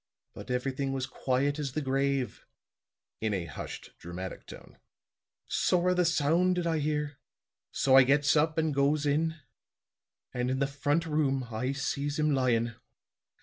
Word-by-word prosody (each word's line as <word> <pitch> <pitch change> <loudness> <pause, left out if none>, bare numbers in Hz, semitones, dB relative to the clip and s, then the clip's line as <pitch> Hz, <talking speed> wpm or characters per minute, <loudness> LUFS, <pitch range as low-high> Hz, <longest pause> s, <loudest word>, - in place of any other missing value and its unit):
But - - -10
everything 135 +2 -1
was 130 -1 -1
quiet 140 +4 -1
as 140 -4 -3
the 155 - -1
grave," 135 -1 -1 0.7
in 110 -2 0
a 90 -3 -3
hushed 75 - -8
dramatic 90 +2 -7
tone. - - -13 0.7
"Sorra 180 0 +2
the 180 -1 +2
sound 165 +3 +2
did 175 -1 -1
I 165 -2 +1
hear. 150 -2 -2 0.5
So 130 -1 +3
I 135 - +10
gets 145 +3 +3
up 155 +1 +2
and 160 -2 +1
goes 140 +2 +2
in. 160 +3 +1 1.0
And 125 0 -1
in 130 - 0
the 140 - +2
front 145 +4 0
room 135 -5 0
I 125 +5 -1
sees 140 +1 -2
him 150 -1 +2
lyin'. 120 -3 +1
140 Hz, 150 wpm, -29 LUFS, 130-150 Hz, 1.0 s, I